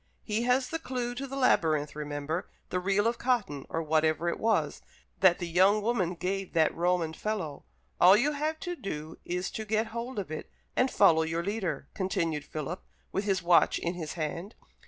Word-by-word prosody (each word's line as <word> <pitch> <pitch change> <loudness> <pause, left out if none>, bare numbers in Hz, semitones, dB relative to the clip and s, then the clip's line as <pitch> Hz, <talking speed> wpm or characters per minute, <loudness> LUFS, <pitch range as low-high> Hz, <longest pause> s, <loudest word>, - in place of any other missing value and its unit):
He 215 +1 -1
has 250 +1 +2
the 325 - -2
clue 250 -5 -3
to 270 +3 -5
the 270 - -6
labyrinth, 155 - +2
remember, 150 +2 -3 0.2
the 180 - +1
reel 195 +3 +1
of 230 0 +1
cotton, 205 - 0
or 165 - -2
whatever 155 +2 +2
it - - -3
was, 200 -10 +1 0.4
that 185 -2 +6
the 175 - -4
young 190 +5 +4
woman 195 -6 0
gave 190 +2 -3
that 160 -2 +3
Roman 170 -1 +1
fellow. 185 -8 -4 0.3
All 185 +3 +8
you 280 +7 +2
have 305 +2 -2
to 355 -2 -3
do 160 - -6
is 180 +1 -2
to 220 - -4
get 220 +1 0
hold 235 +2 -4
of 190 -6 -4
it, 155 - -6 0.3
and 255 - +3
follow 165 -9 +5
your 165 +1 -1
leader." 200 -1 -2
continued 170 -7 -1
Philip, 155 +4 -5 0.3
with 195 - -1
his 190 -3 +1
watch 170 0 +5
in 170 - -2
his 160 -4 -5
hand. 170 +5 -4
185 Hz, 190 wpm, -29 LUFS, 160-220 Hz, 0.4 s, All